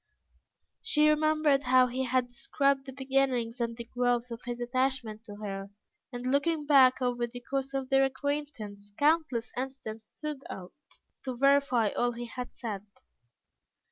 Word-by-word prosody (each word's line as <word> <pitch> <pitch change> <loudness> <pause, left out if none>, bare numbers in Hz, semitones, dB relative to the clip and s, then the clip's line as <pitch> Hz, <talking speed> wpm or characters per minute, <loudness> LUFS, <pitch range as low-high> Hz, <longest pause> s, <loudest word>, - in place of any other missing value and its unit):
She 300 0 +3
remembered 305 -2 +3
how 255 -1 +5
he 255 +1 -2
had 255 0 +2
described 275 +2 0
the - - -5
beginnings 260 -3 0
and 230 -1 -2
the 235 - -5
growth 245 0 0
of 230 +1 -6
his 240 0 -3
attachment 245 -3 -1
to 205 -2 -9
her, 200 -1 -5 0.4
and 245 -1 -6
looking 295 +2 +1
back 265 -3 +6
over 245 -1 0
the 245 +1 -9
course 270 +2 -3
of 265 -1 -2
their 270 0 +5
acquaintance, 260 -7 -4
countless 295 -6 +2
incidents 245 -4 -5
stood 300 -3 -6
out, 180 -1 -8 0.5
to 255 -2 -4
verify 275 -4 +4
all 240 +3 0
he 240 +1 -6
had 250 +1 -6
said. 210 -4 -5
255 Hz, 150 wpm, -30 LUFS, 235-275 Hz, 0.5 s, back